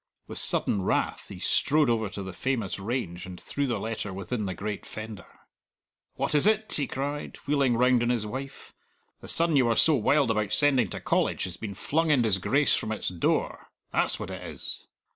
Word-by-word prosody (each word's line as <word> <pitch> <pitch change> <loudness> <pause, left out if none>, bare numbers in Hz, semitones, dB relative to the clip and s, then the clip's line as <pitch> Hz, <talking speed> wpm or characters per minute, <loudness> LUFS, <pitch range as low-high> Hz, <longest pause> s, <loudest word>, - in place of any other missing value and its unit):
With - - -6
sudden 100 - +3
wrath - - -1
he - - -8
strode 150 0 +2
over 110 -3 +1
to 100 - -6
the 95 -1 -7
famous 115 -3 -2
range 95 -5 -3
and 90 -1 -9
threw 140 0 -2
the 120 - -1
letter 110 -2 -4
within 100 +3 -3
the 95 - -4
great 105 +2 -4
fender. 110 -2 -8 0.9
"What - - -1
is 150 +6 +4
it?" 215 0 +2
he 145 - +3
cried, 145 +2 -4
wheeling 140 -4 +2
round 125 0 +4
on 120 - +1
his 120 -3 0
wife. 135 +5 -7 0.5
"The - - -11
son 165 -1 +3
you 130 -3 +5
were 115 - +2
so 160 - +5
wild 140 0 +3
about 105 -2 -1
sending 135 -8 +3
to - - -5
College - - 0
has 90 -2 -4
been 100 -3 -6
flung 160 - 0
in 140 -5 +4
disgrace 115 +7 +2
from 110 - -3
its 110 - -2
door! 90 -2 -1 0.2
That's - - +2
what - - -5
it - - -6
is!" - - -6
120 Hz, 200 wpm, -27 LUFS, 105-140 Hz, 0.9 s, you